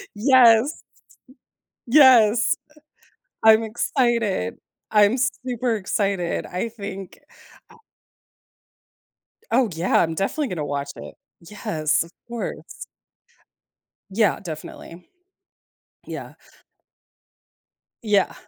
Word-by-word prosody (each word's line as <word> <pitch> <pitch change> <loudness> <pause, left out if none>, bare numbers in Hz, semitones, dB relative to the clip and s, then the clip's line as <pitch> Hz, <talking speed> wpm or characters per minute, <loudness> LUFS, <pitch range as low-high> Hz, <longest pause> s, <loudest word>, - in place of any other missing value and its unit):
Yes. 245 +2 +4 1.0
Yes 240 -4 +5
uh - - -26 0.7
I'm 220 0 +7
excited. 230 - -1 0.3
I'm 210 +3 +4
super 250 -2 -1
excited, 195 -3 -2
I 185 +6 -4
think 200 -4 -9 2.3
Oh, 245 -1 +2
yeah, 165 +3 +1
I'm 165 -1 0
definitely 230 - -2
gonna 160 -5 -4
watch 140 0 -4
it. - - -11 0.2
Yes, 165 -4 -2
of 165 - -16 0.2
course. 235 -1 -7 1.2
Yeah, 200 -1 +1
definitely. 170 0 -10 1.0
Yeah. - - -8 1.7
Yeah. 210 -3 +1
210 Hz, 80 wpm, -22 LUFS, 180-235 Hz, 2.3 s, I'm